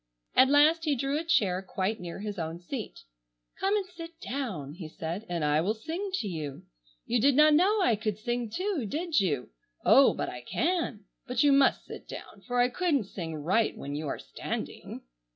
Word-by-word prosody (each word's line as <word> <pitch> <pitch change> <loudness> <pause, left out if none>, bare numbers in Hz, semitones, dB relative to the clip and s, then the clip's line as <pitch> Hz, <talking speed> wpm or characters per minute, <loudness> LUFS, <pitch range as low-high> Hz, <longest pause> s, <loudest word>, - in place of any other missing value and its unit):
At 260 +1 +6
last 310 +3 +5
he 295 -2 +2
drew 275 +3 -1
a - - -3
chair 200 - +2
quite 195 +3 -2
near 175 +2 -7
his 205 -2 -4
own 165 0 -3
seat. 215 +6 -6 0.6
"Come 390 +2 +2
and 410 -2 0
sit 335 -2 -11
down," 220 - -4
he 165 -2 -8
said, 170 +7 -5
"and 170 -3 -1
I 150 +1 +3
will 205 +6 0
sing 335 - -4
to 225 - -2
you. 155 -6 -5 0.4
You 240 -1 +1
did 275 +1 +4
not 305 +1 +7
know 385 +6 +4
I 235 - +4
could 215 -1 -2
sing, 240 +1 -2
too, 360 - -2
did 325 - 0
you? 145 - -1 0.3
Oh, - - +6
I 125 - -4
can. 320 - -1 0.2
But 250 +1 +1
you 290 - +5
must 275 -1 +4
sit - - -10
down - - -9
for 245 0 0
I 245 - +5
couldn't 300 -3 +1
sing 165 -4 -5
right 180 +10 +1
when 140 - -6
you 150 +1 -3
are - - -2
standing." - - -6
235 Hz, 195 wpm, -29 LUFS, -, 0.6 s, not